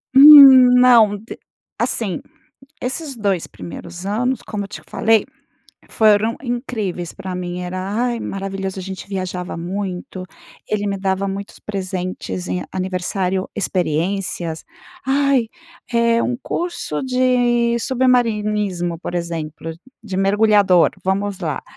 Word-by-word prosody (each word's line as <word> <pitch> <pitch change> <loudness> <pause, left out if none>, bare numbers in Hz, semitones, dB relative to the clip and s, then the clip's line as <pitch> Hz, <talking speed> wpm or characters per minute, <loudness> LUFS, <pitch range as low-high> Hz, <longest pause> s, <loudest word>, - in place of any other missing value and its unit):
Hum, 270 -3 +10
não 230 -5 +6
de 220 +3 -10 0.4
Assim, - - -1 0.6
esses 270 +3 -4
2 200 -6 -1
primeiros 175 +2 -9
anos, 245 +5 -1
como 205 -2 -5
eu - - -9
te - - -9
falei, 225 -2 +2 0.6
foram 215 +1 +3
incríveis, 225 -8 -4
pra 185 -1 -6
mim. 180 0 -4
Era, 180 +1 -5
ai, 235 +2 -1
maravilhoso, 195 -1 -5
a - - -5
gente 190 +1 -8
viajava 185 -2 -4
muito, 185 +1 -5 0.4
ele 205 -1 -1
me 200 -1 -2
dava 190 0 -1
muitos 195 +1 -6
presentes 185 - -5
em 90 0 -2
aniversário 185 0 -2
experiências. 175 -2 -2 0.4
Ai, 275 -3 +2 0.4
é 235 0 +2
um 245 - -1
curso 335 - -4
de 245 -2 +2
submarinismo, 210 -9 0
por 175 - -6
exemplo, 165 -2 -4 0.3
de 195 -4 -5
mergulhador, 200 -2 +4
vamos 195 +1 -1
lá, 155 -5 -3
200 Hz, 120 wpm, -19 LUFS, 180-235 Hz, 0.6 s, Hum